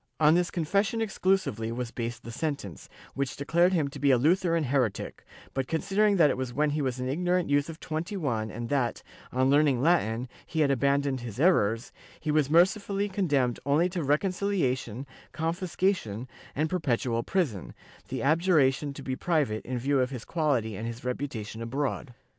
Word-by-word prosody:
On 155 Hz, 0 st, +6 dB
this 175 Hz, +1 st, +2 dB
confession 195 Hz, +6 st, 0 dB
exclusively 185 Hz, -, 0 dB
was 120 Hz, 0 st, -4 dB
based 120 Hz, 0 st, -5 dB
the 115 Hz, -, -7 dB
sentence, 140 Hz, -, -4 dB, 0.2 s
which 135 Hz, -1 st, -2 dB
declared 170 Hz, +5 st, +2 dB
him 160 Hz, -6 st, +1 dB
to 140 Hz, -, -9 dB
be 140 Hz, +1 st, +3 dB
a 130 Hz, -, +6 dB
Lutheran 165 Hz, +4 st, +2 dB
heretic, 125 Hz, -6 st, -1 dB, 0.3 s
but 135 Hz, -1 st, -2 dB
con 160 Hz, -, -1 dB
sidering 205 Hz, 0 st, +2 dB
that 150 Hz, -5 st, +5 dB
it -, -, -3 dB
was 130 Hz, -2 st, -4 dB
when 150 Hz, +1 st, +2 dB
he 150 Hz, +1 st, -1 dB
was 130 Hz, -2 st, -2 dB
an 125 Hz, -, -2 dB
ignorant 175 Hz, +3 st, 0 dB
youth 145 Hz, +2 st, +2 dB
of 165 Hz, 0 st, -8 dB
21 155 Hz, -, -2 dB
and 115 Hz, +2 st, -6 dB
that, 135 Hz, -4 st, 0 dB, 0.3 s
on 130 Hz, +1 st, +2 dB
learning 145 Hz, -3 st, +4 dB
Latin, 130 Hz, -6 st, +2 dB, 0.2 s
he 160 Hz, -, -2 dB
had 140 Hz, -2 st, +3 dB
abandoned 140 Hz, 0 st, +1 dB
his 120 Hz, -1 st, -7 dB
errors, 120 Hz, -, +2 dB, 0.3 s
he 155 Hz, -, -2 dB
was 150 Hz, -2 st, +2 dB
mercifully 200 Hz, +4 st, +2 dB
condemned 145 Hz, -, +1 dB
only 145 Hz, +5 st, +3 dB
to 180 Hz, -1 st, -3 dB
reconciliation, 145 Hz, -, 0 dB, 0.3 s
confiscation, 165 Hz, -, -1 dB, 0.3 s
and 155 Hz, +3 st, +1 dB
perpetual 125 Hz, -9 st, 0 dB
prison, 125 Hz, -, -2 dB, 0.3 s
the 130 Hz, -2 st, -4 dB
abjuration 150 Hz, -3 st, +3 dB
to 140 Hz, -, -8 dB
be 130 Hz, -1 st, -2 dB
private 145 Hz, -10 st, 0 dB
in 125 Hz, 0 st, -2 dB
view 135 Hz, +3 st, +1 dB
of 125 Hz, -1 st, +1 dB
his 125 Hz, -4 st, -7 dB
quality 130 Hz, -, 0 dB
and 110 Hz, +4 st, -4 dB
his 115 Hz, +1 st, -7 dB
reputation 120 Hz, -4 st, -4 dB
abroad. 130 Hz, +1 st, -3 dB
140 Hz, 175 wpm, -28 LUFS, 125-170 Hz, 0.3 s, On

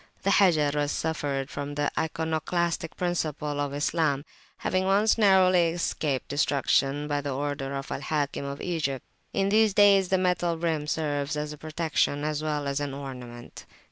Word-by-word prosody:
The 195 Hz, -, +2 dB
Hajar 160 Hz, -8 st, +4 dB
has 145 Hz, 0 st, 0 dB
suffered 140 Hz, -4 st, -2 dB
from 145 Hz, +1 st, -5 dB
the 145 Hz, 0 st, 0 dB
iconoclastic 160 Hz, +1 st, -1 dB
principle 150 Hz, -4 st, -2 dB
of 145 Hz, -1 st, -1 dB
Islam, 145 Hz, 0 st, 0 dB, 0.3 s
having 185 Hz, 0 st, 0 dB
once 205 Hz, +3 st, +4 dB
narrowly 185 Hz, -4 st, +5 dB
escaped 155 Hz, -5 st, -2 dB
destruction 145 Hz, 0 st, +1 dB
by 145 Hz, -1 st, -1 dB
order 140 Hz, 0 st, -3 dB
of 135 Hz, 0 st, -5 dB
Al -, -, -3 dB
Hakim 145 Hz, -1 st, -2 dB
of 140 Hz, 0 st, -5 dB
Egypt. 150 Hz, -7 st, -2 dB, 0.3 s
In 195 Hz, 0 st, +1 dB
these 215 Hz, -1 st, +3 dB
days 200 Hz, -2 st, +5 dB
the 190 Hz, -, +3 dB
metal 180 Hz, -2 st, +1 dB
rim 160 Hz, -3 st, -1 dB
serves 150 Hz, -1 st, -1 dB
as 150 Hz, 0 st, -3 dB
a -, -, -10 dB
protection 155 Hz, -2 st, -1 dB
as 150 Hz, 0 st, -1 dB
well 150 Hz, -2 st, -2 dB
as 140 Hz, +1 st, -1 dB
an 145 Hz, -2 st, -3 dB
ornament. 125 Hz, -3 st, -9 dB
150 Hz, 160 wpm, -27 LUFS, 145-175 Hz, 0.3 s, narrowly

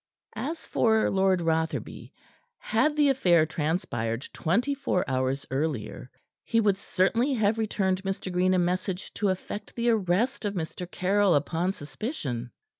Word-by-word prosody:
As 320 Hz, +4 st, -4 dB
for 220 Hz, -1 st, +2 dB
Lord 190 Hz, -2 st, +2 dB
Rotherby, 160 Hz, -1 st, -2 dB, 0.5 s
had 310 Hz, -11 st, +1 dB
the 295 Hz, -2 st, +4 dB
affair 175 Hz, -12 st, +4 dB
transpired 150 Hz, -7 st, -2 dB
twenty 230 Hz, -, +1 dB
four 265 Hz, -10 st, -1 dB
hours 130 Hz, +1 st, -1 dB
earlier, 135 Hz, -5 st, -3 dB, 0.3 s
he 230 Hz, -, +1 dB
would 205 Hz, -3 st, +3 dB
certainly 230 Hz, +9 st, +1 dB
have 220 Hz, 0 st, +1 dB
returned 190 Hz, -4 st, 0 dB
Mr. 190 Hz, -1 st, -4 dB
Green 185 Hz, +1 st, +3 dB
a -, -, +3 dB
message 180 Hz, +2 st, -1 dB
to 205 Hz, -, 0 dB
effect 190 Hz, +2 st, -5 dB
the 235 Hz, 0 st, +2 dB
arrest 220 Hz, +6 st, +1 dB
of 205 Hz, -1 st, -2 dB
Mr. 175 Hz, +1 st, -5 dB
Caryll 195 Hz, 0 st, +2 dB
upon 165 Hz, +5 st, 0 dB
suspicion. 140 Hz, -, -5 dB
185 Hz, 140 wpm, -27 LUFS, 160-220 Hz, 0.5 s, the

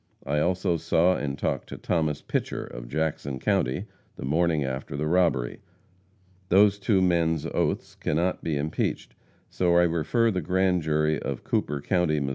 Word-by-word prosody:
I 75 Hz, +2 st, 0 dB
also 90 Hz, +1 st, +1 dB
saw 85 Hz, +3 st, +2 dB
and 70 Hz, -1 st, -3 dB
talked -, -, -2 dB
to -, -, -7 dB
Thomas 80 Hz, -4 st, -1 dB
Pitcher, -, -, -2 dB
of -, -, -9 dB
Jackson 75 Hz, -1 st, -2 dB
county, 65 Hz, 0 st, 0 dB, 0.3 s
the -, -, -6 dB
morning 80 Hz, +1 st, +1 dB
after 65 Hz, +1 st, -4 dB
the 75 Hz, -, -1 dB
robbery. 80 Hz, -8 st, +1 dB, 0.9 s
Those 100 Hz, +2 st, +5 dB
two 100 Hz, -2 st, +2 dB
men's 85 Hz, -3 st, +1 dB
oaths -, -, -1 dB
cannot 85 Hz, +4 st, -1 dB
be 80 Hz, -3 st, -1 dB
impeached, 75 Hz, +2 st, -2 dB, 0.4 s
so 85 Hz, -1 st, +2 dB
I 90 Hz, -, +6 dB
refer 85 Hz, +8 st, +2 dB
the 95 Hz, -2 st, -1 dB
grand 90 Hz, +2 st, +1 dB
jury 75 Hz, -1 st, +1 dB
of 70 Hz, -3 st, -4 dB
Cooper 70 Hz, -1 st, -1 dB
county, 85 Hz, -2 st, +1 dB
Mo. 70 Hz, -1 st, -2 dB
80 Hz, 160 wpm, -26 LUFS, 75-90 Hz, 0.9 s, I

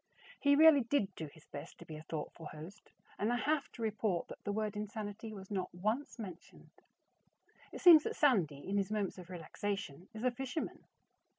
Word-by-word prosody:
He 285 Hz, 0 st, +5 dB
really 310 Hz, -1 st, +8 dB
did 230 Hz, -5 st, 0 dB
do 160 Hz, -3 st, -6 dB
his 155 Hz, +2 st, -17 dB
best -, -, -9 dB
to -, -, -12 dB
be 155 Hz, -, -8 dB
a 155 Hz, -, -8 dB
thoughtful 160 Hz, 0 st, -6 dB
host 160 Hz, +8 st, -11 dB, 0.3 s
and 215 Hz, +3 st, +1 dB
I -, -, +2 dB
have 290 Hz, +3 st, 0 dB
to 230 Hz, -, -6 dB
report 215 Hz, -4 st, 0 dB
that -, -, -10 dB
the 205 Hz, -, -1 dB
word 215 Hz, 0 st, -1 dB
"insanity" 210 Hz, +1 st, -5 dB
was 195 Hz, -1 st, -9 dB
not 185 Hz, -3 st, -2 dB
once 215 Hz, +12 st, -1 dB
mentioned. 190 Hz, -7 st, -10 dB, 1.0 s
It -, -, -8 dB
seems 340 Hz, -4 st, +10 dB
that -, -, -2 dB
Sandy, 175 Hz, -, +2 dB
in 200 Hz, +1 st, 0 dB
his 200 Hz, 0 st, 0 dB
moments 205 Hz, -3 st, -1 dB
of 180 Hz, -1 st, -11 dB
relaxation, 185 Hz, -1 st, -4 dB
is 220 Hz, +1 st, -7 dB
a 255 Hz, -, +3 dB
fisherman. 265 Hz, +5 st, -4 dB
205 Hz, 190 wpm, -35 LUFS, 180-240 Hz, 1.0 s, seems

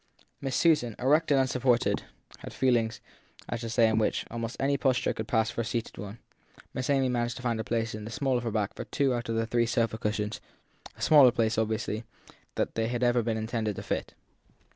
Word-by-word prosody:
Miss 135 Hz, -2 st, -2 dB
Susan, 150 Hz, -10 st, +3 dB
erect 150 Hz, +6 st, +3 dB
and 140 Hz, -2 st, +4 dB
unsupported, 125 Hz, -2 st, +2 dB, 0.4 s
had -, -, -9 dB
feelings 120 Hz, -4 st, +1 dB, 0.5 s
as 120 Hz, -, -4 dB
to 115 Hz, -, -4 dB
the 115 Hz, -, -3 dB
way -, -, +7 dB
in 110 Hz, 0 st, +2 dB
which, 110 Hz, -, 0 dB
in -, -, -20 dB
almost 115 Hz, +1 st, -4 dB
any 140 Hz, +1 st, +2 dB
posture 130 Hz, -2 st, +1 dB
that -, -, -8 dB
could 110 Hz, -, -4 dB
pass 110 Hz, -1 st, +1 dB
for -, -, -2 dB
a -, -, -2 dB
seated 115 Hz, -2 st, -4 dB
one, 100 Hz, +2 st, -7 dB, 0.6 s
Miss 130 Hz, +1 st, -3 dB
Amy 135 Hz, -2 st, +3 dB
managed 120 Hz, -1 st, -1 dB
to 125 Hz, -, -9 dB
find 120 Hz, -2 st, 0 dB
a -, -, -1 dB
place 115 Hz, 0 st, -1 dB
in 105 Hz, 0 st, -6 dB
the 110 Hz, -, -6 dB
small 130 Hz, +3 st, 0 dB
of 120 Hz, -, -1 dB
her 115 Hz, -, -1 dB
back 105 Hz, -2 st, -1 dB
for -, -, -7 dB
two 140 Hz, -3 st, +1 dB
out 120 Hz, -1 st, -3 dB
of 115 Hz, -, 0 dB
the 115 Hz, 0 st, +1 dB
three 115 Hz, +1 st, +1 dB
sofa 115 Hz, -1 st, 0 dB
cushions 105 Hz, 0 st, -2 dB, 0.6 s
a -, -, -6 dB
smaller 145 Hz, -5 st, +8 dB
place, 115 Hz, -1 st, +1 dB
obviously, 110 Hz, 0 st, -1 dB, 0.5 s
than -, -, 0 dB
they 115 Hz, 0 st, 0 dB
had 120 Hz, +1 st, -2 dB
ever 120 Hz, 0 st, +3 dB
been 115 Hz, -1 st, -1 dB
intended 110 Hz, -1 st, -2 dB
to -, -, -6 dB
fit. -, -, -3 dB
115 Hz, 230 wpm, -28 LUFS, 110-125 Hz, 0.6 s, smaller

